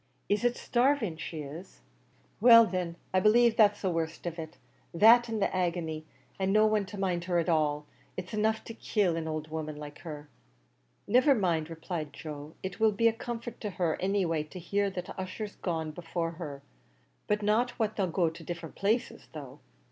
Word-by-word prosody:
"Is 205 +2 +1
it 245 0 +2
starving 245 - +1
she 160 -1 -5
is?" 160 +7 -10 0.6
"Well 230 -1 +9
thin, 180 -3 -3 0.2
I 185 - +4
b'lieve 230 +3 +5
that's 205 -2 +4
the 190 - +1
worst 165 0 -3
of 170 -1 -4
it; 160 -1 -7 0.4
that 230 +6 +7
an' 225 - -2
the 195 -2 0
agny, 170 -3 -1 0.3
an' 190 0 +1
no 215 +1 +5
one 215 -2 +1
to 205 - -8
mind 180 -3 -1
her 175 -1 +1
at 170 0 +1
all, 150 -2 +1 0.3
is 185 +2 -6
enough 220 +1 +1
to 230 - -8
kill 205 -6 0
an 165 -1 -3
owld 155 0 -4
woman 155 -1 -4
like 150 0 -9
her." 150 -3 -8 0.8
"Niver 255 +6 +5
mind," 170 -7 0
replied 160 -2 -5
Joe, 150 0 -8
"it 190 -1 -5
will 220 -1 +4
be 230 +3 +3
a - - -2
comfort 235 +1 -6
to 210 - -2
her 175 -4 0
any 195 0 +1
way 165 -2 0
to 155 +5 -9
hear 200 +3 0
that 185 -2 -6
Ussher's 200 +3 -5
gone 160 -3 -2
before 165 +1 -3
her; 150 -5 -7 0.8
not 215 +4 +2
but - - -11
what 220 -2 0
they'll 195 -3 0
go 175 0 +1
to 165 - -11
different 170 -2 -6
places, 215 +4 -1
though." - - -9
185 Hz, 195 wpm, -30 LUFS, 160-215 Hz, 0.8 s, Well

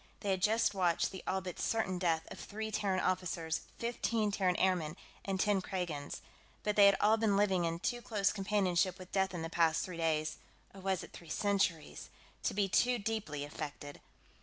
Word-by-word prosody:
They 200 - 0
had 190 -1 0
just 225 +3 +3
watched 180 -4 +1
the 190 - -7
all 190 0 0
but 180 -2 -7
certain 190 -5 0
death 165 -3 +1
of - - -8
three 220 +1 -5
Terran 195 -3 0
officers, 170 -3 -1 0.2
fifteen 230 -2 0
Terran 185 -3 +1
airmen, 180 -4 +1 0.3
and 195 -1 -1
ten 205 -1 +2
Kragans, 175 -7 -4 0.4
but 210 -1 0
they 205 -1 +8
had 200 - +5
all 215 +2 +4
been 215 -3 +2
living 190 -4 +3
in 165 0 -1
too 240 +7 -2
close 205 -4 +1
companionship 190 -3 +1
with 185 -1 -11
death 190 -1 +1
in 165 - -3
the - - -2
past 165 -1 +2
three 180 -3 -7
days 155 -2 0 0.3
or 195 - -11
was 190 -2 0
it - - -12
three 170 - -11
centuries 195 -7 0 0.3
to - - -1
be 200 -1 +2
too 245 +7 +3
deeply 200 -10 -3
affected. 145 -1 -7
190 Hz, 190 wpm, -34 LUFS, 170-205 Hz, 0.4 s, they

